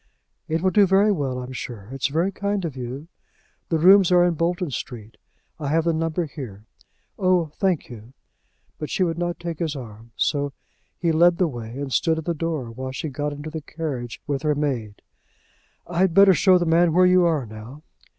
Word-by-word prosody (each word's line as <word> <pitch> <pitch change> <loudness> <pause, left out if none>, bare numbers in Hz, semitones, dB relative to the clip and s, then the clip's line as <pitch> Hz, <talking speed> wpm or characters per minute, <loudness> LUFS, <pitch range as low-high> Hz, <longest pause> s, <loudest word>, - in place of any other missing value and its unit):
"It 160 +2 -1
will 185 - +3
do 200 +1 +5
very 195 +3 +4
well 140 -9 -1
I'm 125 0 -6
sure. 115 -5 -7
It's 135 -1 -1
very 165 +7 0
kind 200 -2 -2
of 155 -5 -5
you. 130 +4 -6 0.6
The 165 - +2
rooms 185 +3 +6
are 175 0 +6
in 175 - +2
Bolton 170 0 -1
Street. 115 -3 -7 0.4
I 145 - -4
have 160 +3 +2
the 170 0 +1
number 165 +2 -1
here. 120 -9 -9 0.5
Oh! 180 -4 +2
thank 185 -5 +1
you." 120 +1 -12 0.7
But 150 - -5
she 185 - +1
would 170 -1 -1
not 175 0 -2
take 170 -2 -5
his 160 -4 -2
arm. 115 -3 -10
So 145 -1 0 0.4
he 170 -2 +1
led 170 +2 +4
the 180 - +2
way, 120 -3 -7
and 140 -2 -4
stood 160 -2 +2
at 160 - -5
the 170 - 0
door 155 -7 -3
while 130 +3 -6
she 140 +4 -4
got 145 +2 -3
into 145 +2 -7
the 160 0 -5
carriage 140 -7 -5
with 140 -1 -2
her 150 -1 +1
maid. 125 -8 -3 0.8
"I'd 175 0 +1
better 195 -1 +8
show 185 +1 +5
the 175 - 0
man 165 0 +3
where 180 +2 +5
you 180 -1 +5
are 155 -6 +1
now." 110 +7 -11
160 Hz, 200 wpm, -23 LUFS, 130-175 Hz, 0.8 s, better